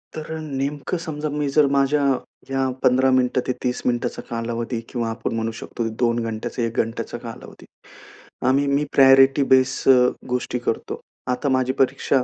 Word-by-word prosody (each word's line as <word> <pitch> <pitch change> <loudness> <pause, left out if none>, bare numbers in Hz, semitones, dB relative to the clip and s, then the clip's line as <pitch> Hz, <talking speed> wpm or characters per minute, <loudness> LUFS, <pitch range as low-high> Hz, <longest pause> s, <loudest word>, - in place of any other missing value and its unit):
तर 155 0 -6
नेमकं 145 +2 -3
समजा 155 -2 -4
मी 145 0 -2
जर 150 - +6
माझ्या 140 +1 +2 0.5
या 135 -1 0
15 130 +1 +4
मिनिटं 125 0 +1
ते - - +1
30 125 -1 -1
मिनिटांचा 120 -1 -1
कालावधी 115 0 -3
किंवा 120 -2 -2
आपण 115 0 -4
म्हणू 115 0 -1
शकतो 115 -1 -4
2 120 -1 +2
घंटे, 115 +2 -4
1 115 0 -5
घंट्याचा 115 +1 -2
कालावधी 115 -1 -10 0.8
आम्ही 135 +2 +3
मी 140 +1 +1
प्रायोरिटी 135 +1 +6
बेस 130 0 +5 0.2
अ, 125 -1 +6 0.2
गोष्टी 125 0 -2
करतो. 120 - -3 0.3
आता 135 +3 -1
माझी 130 0 +1
परीक्षा 135 0 +2
130 Hz, 155 wpm, -22 LUFS, 120-140 Hz, 0.8 s, जर